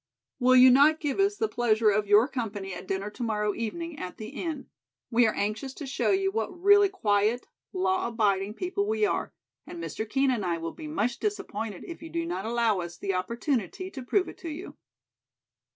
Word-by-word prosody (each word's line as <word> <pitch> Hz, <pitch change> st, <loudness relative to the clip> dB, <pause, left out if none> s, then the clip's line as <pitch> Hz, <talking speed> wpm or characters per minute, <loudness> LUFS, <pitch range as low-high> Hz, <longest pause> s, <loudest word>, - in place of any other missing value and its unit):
"'Will 255 Hz, 0 st, +5 dB
you 255 Hz, 0 st, +9 dB
not 295 Hz, +5 st, +5 dB
give 295 Hz, +3 st, -2 dB
us 400 Hz, +1 st, +2 dB
the 440 Hz, -, +1 dB
pleasure 225 Hz, -, +2 dB
of 205 Hz, +1 st, 0 dB
your 210 Hz, +4 st, +6 dB
company 210 Hz, -8 st, -4 dB
at 185 Hz, -, -8 dB
dinner 195 Hz, +2 st, -2 dB
to 230 Hz, -, -11 dB
morrow 210 Hz, -3 st, 0 dB
evening 320 Hz, +10 st, -5 dB
at 180 Hz, -, -6 dB
the 215 Hz, 0 st, -7 dB
Inn? 310 Hz, -5 st, -5 dB, 0.5 s
We 235 Hz, 0 st, +5 dB
are 215 Hz, -, -1 dB
anxious 215 Hz, +6 st, -2 dB
to 295 Hz, -, -7 dB
show 270 Hz, -, -1 dB
you 390 Hz, 0 st, +2 dB
what 380 Hz, -4 st, -3 dB
really 405 Hz, +1 st, +6 dB
quiet, 220 Hz, -, +1 dB, 0.3 s
law 370 Hz, -2 st, 0 dB
abiding 210 Hz, -3 st, 0 dB
people 385 Hz, +5 st, -2 dB
we 435 Hz, 0 st, +2 dB
are, -, -, -1 dB, 0.4 s
and 345 Hz, -, -8 dB
Mr. 220 Hz, -9 st, -5 dB
Kean 270 Hz, +2 st, +2 dB
and 230 Hz, -5 st, -1 dB
I 175 Hz, -2 st, 0 dB
will 165 Hz, 0 st, -5 dB
be 310 Hz, -, -8 dB
much 245 Hz, -6 st, -1 dB
disappointed 225 Hz, -, -4 dB
if 340 Hz, -, -9 dB
you 325 Hz, -, -8 dB
do 335 Hz, 0 st, -2 dB
not 340 Hz, -9 st, -3 dB
allow 230 Hz, -4 st, +1 dB
us 170 Hz, -1 st, -6 dB
the 195 Hz, -1 st, -2 dB
opportunity 235 Hz, -, -2 dB
to 270 Hz, -, -7 dB
prove 360 Hz, +10 st, +1 dB
it -, -, -10 dB
to 335 Hz, -, -6 dB
you.'" 320 Hz, +5 st, -7 dB
250 Hz, 205 wpm, -27 LUFS, 210-340 Hz, 0.5 s, you